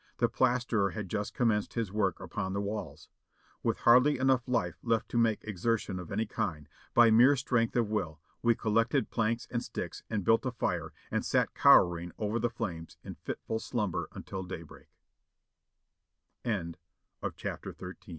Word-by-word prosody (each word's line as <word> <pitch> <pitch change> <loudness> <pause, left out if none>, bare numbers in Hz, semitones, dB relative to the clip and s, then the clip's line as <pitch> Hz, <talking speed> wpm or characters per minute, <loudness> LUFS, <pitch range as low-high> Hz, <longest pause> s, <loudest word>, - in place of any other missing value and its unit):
The - - +3
plasterer 120 -5 +1
had 105 -4 -5
just 105 -1 -3
commenced 110 -4 +1
his 115 -5 -1
work 95 -4 0
upon 95 0 -4
the 100 - -1
walls. 100 +1 -5 0.5
With - - 0
hardly 125 +5 +6
enough 130 -1 +2
life 125 -2 -1
left 115 -2 0
to - - -2
make 115 -2 +2
exertion 105 -1 -1
of 90 - -8
any 110 +3 0
kind, 90 -10 -3 0.3
by 115 -1 +7
mere 125 +6 +7
strength 125 -3 0
of 120 -3 +2
will 85 -8 -2 0.2
we 120 -1 +4
collected 115 +4 +1
planks 115 +1 0
and 120 -1 -1
sticks - - -5
and 110 -3 -1
built 115 - +4
a 130 - -1
fire 120 - -2 0.2
and - - 0
sat - - +1
cowering 85 0 +5
over 110 +2 -1
the 120 +1 +1
flames 85 -8 -5
in - - -7
fitful 110 - -4
slumbe 105 -6 -2
110 Hz, 145 wpm, -31 LUFS, 100-120 Hz, 0.5 s, by